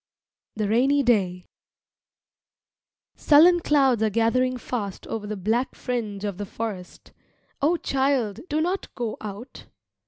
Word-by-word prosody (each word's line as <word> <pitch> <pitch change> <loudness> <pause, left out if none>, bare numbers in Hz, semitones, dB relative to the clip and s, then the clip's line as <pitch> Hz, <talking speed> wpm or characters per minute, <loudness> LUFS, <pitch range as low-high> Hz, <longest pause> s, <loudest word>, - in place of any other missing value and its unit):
THE 215 -1 -1
RAINY 270 +6 +3
DAY 185 -7 +1 1.7
Sullen 335 +4 +6
clouds 270 -8 +2
are 220 - +2
gathering 250 +4 +1
fast 215 -5 -5
over 215 -2 -5
the 215 0 -4
black 225 +7 -1
fringe 215 -5 -4
of 200 -2 -4
the 205 - -3
forest. 200 -4 -7 0.5
O 320 +5 +3
child, 265 -8 0
do 305 +1 0
not 365 +4 -1
go 235 -4 -3
out! 215 +4 -9
235 Hz, 125 wpm, -24 LUFS, 210-270 Hz, 1.7 s, Sullen